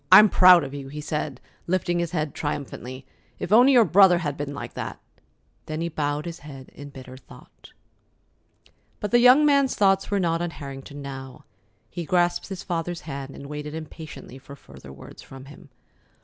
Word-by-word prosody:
I'm 215 Hz, 0 st, +9 dB
proud 180 Hz, -3 st, +7 dB
of 135 Hz, 0 st, -7 dB
you," 140 Hz, -1 st, -7 dB
he 150 Hz, +2 st, -8 dB
said, 150 Hz, -3 st, -4 dB, 0.3 s
lifting 175 Hz, -1 st, 0 dB
his 170 Hz, -1 st, -1 dB
head 155 Hz, -4 st, -3 dB
triumphantly. 135 Hz, -3 st, -5 dB, 0.3 s
"If -, -, -6 dB
only 245 Hz, +5 st, +6 dB
your 240 Hz, -3 st, +6 dB
brother 185 Hz, 0 st, +6 dB
had 150 Hz, -5 st, -3 dB
been 145 Hz, 0 st, -5 dB
like 140 Hz, -, -7 dB
that!" -, -, -6 dB, 0.7 s
Then 155 Hz, 0 st, -4 dB
he 170 Hz, -, -2 dB
bowed 150 Hz, -1 st, -2 dB
his 170 Hz, -1 st, -7 dB
head 135 Hz, -3 st, -11 dB
in 145 Hz, 0 st, -10 dB
bitter 130 Hz, -2 st, -11 dB
thought. 130 Hz, -, -17 dB, 1.3 s
But 210 Hz, -, -4 dB
the 240 Hz, -, +5 dB
young 250 Hz, +5 st, +7 dB
man's 280 Hz, -2 st, +3 dB
thoughts 195 Hz, -1 st, +2 dB
were 200 Hz, -1 st, 0 dB
not 165 Hz, -2 st, 0 dB
on 175 Hz, -, -2 dB
Harrington 140 Hz, 0 st, -9 dB
now. 135 Hz, -1 st, -9 dB, 0.4 s
He 175 Hz, -, -6 dB
grasped 175 Hz, +1 st, +1 dB
his 190 Hz, -2 st, -7 dB
father's 175 Hz, -1 st, -3 dB
hand, 140 Hz, -3 st, -7 dB
and 140 Hz, -, -10 dB
waited 150 Hz, +1 st, -6 dB
impatiently 155 Hz, -4 st, -9 dB
for 140 Hz, +1 st, -12 dB
further 70 Hz, -, -14 dB
words 70 Hz, -, -13 dB
from 135 Hz, 0 st, -12 dB
him. 145 Hz, +2 st, -15 dB
155 Hz, 180 wpm, -24 LUFS, 140-180 Hz, 1.3 s, I'm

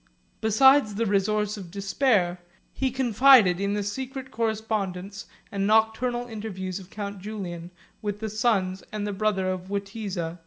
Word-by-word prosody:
Besides 220 Hz, +1 st, +5 dB
the 230 Hz, +3 st, 0 dB
resource 210 Hz, +1 st, +1 dB
of 185 Hz, -4 st, -8 dB
despair, 195 Hz, -1 st, +1 dB, 0.3 s
he 265 Hz, -, 0 dB
confided 245 Hz, -6 st, +5 dB
in 200 Hz, +1 st, 0 dB
the 205 Hz, -, -1 dB
secret 260 Hz, +5 st, -5 dB
correspondence 210 Hz, -4 st, -3 dB, 0.2 s
and 195 Hz, 0 st, -1 dB
nocturnal 220 Hz, +3 st, +2 dB
interviews 195 Hz, -4 st, -5 dB
of 185 Hz, -1 st, -13 dB
count 200 Hz, -1 st, -6 dB
Julian, 180 Hz, -5 st, -6 dB, 0.3 s
with 205 Hz, -1 st, -3 dB
the 220 Hz, -, -3 dB
sons 200 Hz, -4 st, +1 dB
and 210 Hz, -1 st, -3 dB
the 205 Hz, -, -3 dB
brother 195 Hz, -2 st, 0 dB
of 185 Hz, 0 st, -6 dB
Witiza. 195 Hz, -4 st, -4 dB
205 Hz, 145 wpm, -26 LUFS, 195-220 Hz, 0.3 s, Besides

